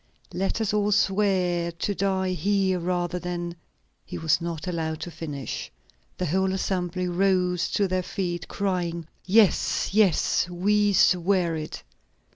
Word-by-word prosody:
Let 195 +4 -1
us 215 -2 0
all 210 0 +1
swear 185 -4 +2
to 185 +4 -2
die 190 -1 0
here 190 +1 +1
rather 175 0 -1
than 175 -1 -4 0.2
" - - -43
He - - -7
was 160 +1 +1
not 170 -1 -4
allowed 160 -3 -2
to 175 - -5
finish. 150 -4 -6 0.5
The 180 - -1
whole 190 +3 +1
assembly 185 -1 -1
rose 180 -1 +1
to 200 - +2
their 185 0 0
feet, 175 -1 -4
crying: 175 -4 -2 0.2
"Yes, 200 -1 +3
yes; 195 -3 +3
we 205 +4 +2
swear 180 -2 +3
it!" 155 -1 -6
180 Hz, 140 wpm, -25 LUFS, 170-195 Hz, 0.5 s, Yes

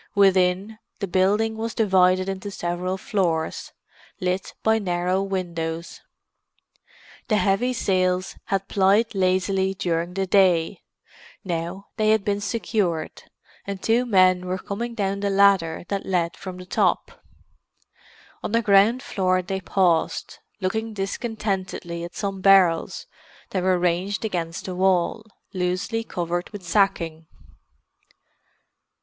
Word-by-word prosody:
Within, 195 +2 +3 0.2
the 200 - -2
building 200 +4 +1
was 225 +1 -4
divided 185 -3 +3
into 195 +1 -4
several 180 0 -3
floors, 175 -6 -1 0.5
lit 185 +1 -2
by 220 0 +3
narrow 180 -1 0
windows. 170 -4 -4 1.3
The 215 - +2
heavy 210 +5 +2
sails 185 -5 0
had 195 0 -1
plied 205 +4 +3
lazily 190 0 +1
during 170 0 -2
the 195 0 0
day; 180 -4 +3 0.6
now 175 +2 -4
they 215 -1 +2
had 215 -2 +3
been 205 -1 0
secured, 200 -5 -2 0.4
and 200 -1 -4
two 235 +5 +1
men 185 -3 +4
were 185 +1 -1
coming 230 +5 -5
down 200 -2 -1
the 200 0 -1
ladder 195 -5 +3
that 200 -1 -2
led 175 -2 0
from 185 -1 -8
the 180 - -9
top. - - 0 1.2
On - - -4
the 230 0 +2
ground 210 +5 +4
floor 185 -1 0
they 190 +1 -3
paused, 175 -3 0 0.2
looking 220 +3 -2
discontentedly 195 -4 -3
at 175 - -8
some 195 -1 -3
barrels 185 -4 +4 0.5
that 185 - -1
were 185 0 +2
ranged 180 +5 0
against 170 -5 -3
the 185 - -4
wall, 185 +3 +1 0.3
loosely 185 +5 -1
covered 175 -3 -3
with 205 -3 -9
sacking. 170 -3 0
190 Hz, 125 wpm, -24 LUFS, 180-200 Hz, 1.3 s, men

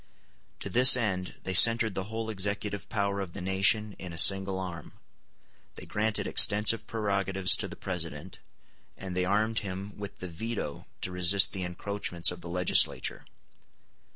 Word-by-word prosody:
To - - -5
this 125 +1 +7
end 95 -6 -4
they 95 - -5
centred 115 +2 +7
the 95 0 -5
whole 110 +1 -6
executive 100 0 -4
power 100 -1 -3
of 90 -3 -8
the - - -8
nation 100 +3 -1
in 90 - -9
a - - -9
single 95 +1 +3
arm; 90 -3 -9 0.8
they - - -11
granted 105 +1 -2
extensive 105 +2 +4
prerogatives 95 -3 0
to - - -4
the - - -10
President, 85 -2 -7 0.6
and 95 -2 -8
they 90 0 -1
armed 110 +3 -1
him 100 +1 -8
with 100 -1 -9
the 90 - -8
veto 90 -3 -7
to 90 - -4
resist 90 +2 +3
the 95 - -5
encroachments 90 -1 -1
of 90 0 -10
the 85 - -10
legislature. 90 +1 0
95 Hz, 155 wpm, -27 LUFS, 90-105 Hz, 0.8 s, this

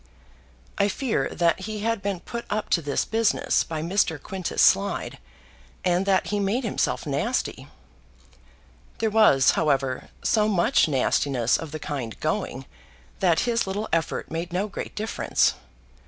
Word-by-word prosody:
I 200 - +4
fear 230 +4 -1
that 170 0 +1
he 215 -1 -4
had 230 -1 0
been 195 -2 -3
put 235 0 -6
up 210 0 -2
to 170 - +3
this 145 -2 -1
business 225 -1 +1
by 160 -2 -4
Mr. 170 -3 +1
Quintus 190 +3 -5
Slide, 200 +1 +3 0.7
and 180 +2 +1
that 190 -1 +3
he 205 - 0
made 205 +6 0
himself 220 - -1
nasty. 145 - -2 1.3
There 220 -1 0
was, 205 - +5
however, 135 -3 0
so 215 -1 +3
much 190 -6 +3
nastiness 130 -3 +1
of 160 -2 -4
the 155 - -4
kind 135 -8 -5
going, - - -2 0.5
that 175 -4 +3
his 235 -3 0
little 205 +3 -3
effort 165 -1 -1
made 165 +2 -4
no 185 +4 -1
great 200 - -7
difference. 220 +1 +1
190 Hz, 145 wpm, -25 LUFS, 155-210 Hz, 1.3 s, was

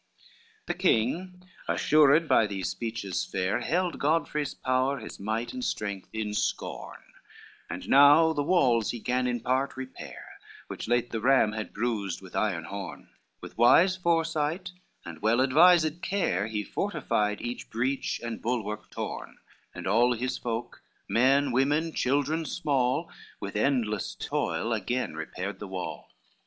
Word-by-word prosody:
XVI 450 -2 -30
The - - -1
king 180 - 0 0.2
assured 155 +1 +4
by 110 - +4
these 95 -3 -3
speeches 100 -1 -3
fair, 95 0 -1
Held 180 +1 -1
Godfrey's 150 -1 0
power, 130 +2 0
his - - -9
might 110 +4 -3
and 255 -1 -5
strength 100 - -3
in 110 -1 -3
scorn, - - -3 0.7
And 90 +3 -6
now 145 +4 +7
the 145 - -1
walls 135 - +3
he 120 - -3
gan 125 +2 0
in 120 -1 -1
part 130 +3 0
repair, 130 0 -9 0.3
Which - - -6
late 120 +1 +1
the 115 - -3
ram 130 -3 +4
had 110 0 -5
bruised 105 -5 -2
with 95 -2 -13
iron 95 -7 0
horn, 100 +3 -7 0.3
With - - -11
wise 175 +10 +6
foresight 165 0 0 0.3
and 85 -1 -9
well 110 +3 +3
advised 160 +4 +5
care 140 - 0
He 105 -2 -3
fortified 105 - -1
each 120 +1 -6
breach 130 +4 -1
and 120 -1 -5
bulwark 110 -3 -3
torn, - - -6 0.4
And - - -7
all 120 +5 +3
his 125 +2 -2
folk, 115 0 -5 0.3
men, 135 +4 +3
women, 145 +6 +1
children 145 +5 0
small, 145 -1 0 0.3
With 100 0 -6
endless 110 -3 0
toil 115 - -2
again 120 +2 -2
repaired 90 +5 -5
the 105 - -6
wall. 95 -1 -6
125 Hz, 145 wpm, -28 LUFS, 105-150 Hz, 0.7 s, now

